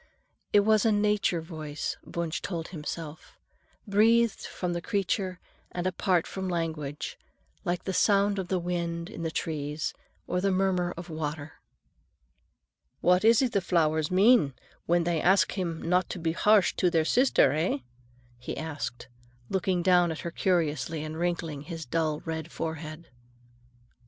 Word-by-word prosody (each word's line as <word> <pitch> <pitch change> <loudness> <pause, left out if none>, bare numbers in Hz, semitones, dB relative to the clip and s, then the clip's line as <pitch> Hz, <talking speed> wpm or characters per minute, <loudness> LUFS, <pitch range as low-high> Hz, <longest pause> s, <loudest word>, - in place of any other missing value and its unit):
It 205 - +6
was 215 0 +3
a 225 - +4
nature 205 -4 +2
voice, 155 -3 -5
Wunsch 170 -1 -3
told 170 -3 -4
himself, 160 -1 -7 0.5
breathed 225 +2 +3
from 180 -1 -3
the 175 - -3
creature 190 -2 -1 0.3
and 175 0 -4
apart 185 -1 +1
from 190 -1 -4
language, 160 -4 -3 0.5
like 175 0 -1
the 190 - -3
sound 200 0 +3
of 185 - -3
the 185 - 0
wind 170 0 -3
in 220 - -7
the 165 - -1
trees, 150 -2 -3 0.3
or 180 - -1
the 195 - +2
murmur 185 -2 +1
of 170 0 -8
water. 150 -1 -5 1.4
"What 180 +2 +4
is 230 +3 +6
it 250 - +1
the 200 - +1
flowers 160 -3 +1
mean 190 - +4 0.3
when 175 0 +3
they 170 -1 0
ask 190 +2 +4
him 170 -4 -3
not 180 +2 +2
to - - -4
be 165 -1 -1
harsh 205 +3 +4
to 180 - +3
their 165 -2 +2
sister, 255 +9 +4
eh?" 155 0 0 0.6
he 125 - -6
asked, 145 -6 -5 0.4
looking 185 -2 0
down 180 -2 +4
at 160 - -5
her 170 - -4
curiously 160 -4 0
and 155 +1 -6
wrinkling 165 -4 -2
his 165 +1 -7
dull 155 +2 -1
red 160 0 -4
forehead. 160 0 -5
175 Hz, 150 wpm, -28 LUFS, 160-190 Hz, 1.4 s, It